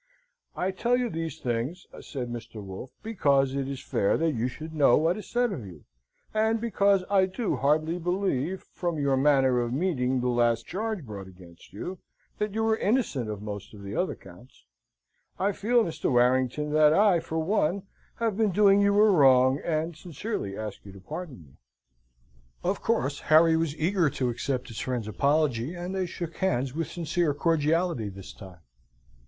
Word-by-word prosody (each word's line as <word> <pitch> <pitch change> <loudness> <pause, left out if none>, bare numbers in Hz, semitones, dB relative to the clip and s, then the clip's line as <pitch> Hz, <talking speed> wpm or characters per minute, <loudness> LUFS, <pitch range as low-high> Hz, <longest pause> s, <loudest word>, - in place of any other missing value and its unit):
"I 185 +1 -1
tell 240 +6 +1
you 245 -3 -1
these 165 -2 -4
things," 125 +9 -3
said 125 -4 -6
Mr. 120 -1 -8
Wolfe, 100 +5 -8
"because 140 -11 +2
it 135 -1 -2
is 135 -1 -5
fair 100 - +1
that 165 0 +1
you 120 -3 -1
should 155 +5 -8
know 145 -6 +5
what 165 +3 +2
is 210 -2 -9
said 245 -1 +1
of 160 - -5
you, 90 -7 -11 0.5
and 220 +1 +2
because 200 -4 +2
I 190 -1 +3
do 205 +3 -2
heartily 155 +4 +1
believe, 180 -2 -1
from 175 -3 -2
your 140 -2 +1
manner 135 -2 +3
of 120 -1 -1
meeting 130 -4 0
the 125 - -1
last 120 -1 +2
charge 210 -3 -3
brought 100 -4 -8
against 90 -2 -16
you, 175 - -6 0.4
that 210 -1 -2
you 220 0 +1
are 220 - +2
innocent 200 - 0
of 105 -1 -5
most 105 0 -7
of 100 - -11
the 100 +1 -6
other 185 - 0
counts. 95 +7 -17 0.7
I 200 +2 +1
feel, 235 +4 +2
Mr. 160 -4 -2
Warrington, 130 +4 +2
that 155 0 +5
I, 200 -2 +4
for 160 - -5
one, 185 +2 0 0.3
have 230 -3 -1
been 220 0 +2
doing 200 +1 +5
you 200 0 +3
a 215 - +7
wrong; 135 -7 +5
and 165 0 -1
sincerely 160 - -5
ask 110 -1 -6
you 100 - -11
to 95 - -12
pardon 150 - -8
me." 70 -3 -21 1.1
Of - - -1
course, 140 +3 0
Harry 160 +1 +5
was 160 -2 -1
eager 170 0 +2
to 125 -2 -1
accept 125 +2 -3
his 110 - -7
friend's 125 -4 -3
apology, 140 - +1
and 175 +2 -5
they 190 -1 -1
shook 170 -1 -6
hands 130 -8 0
with 165 +1 -2
sincere 170 -2 -1
cordiality 160 - +1
this 95 -1 -10
time. 95 -4 -13
155 Hz, 180 wpm, -27 LUFS, 125-185 Hz, 1.1 s, a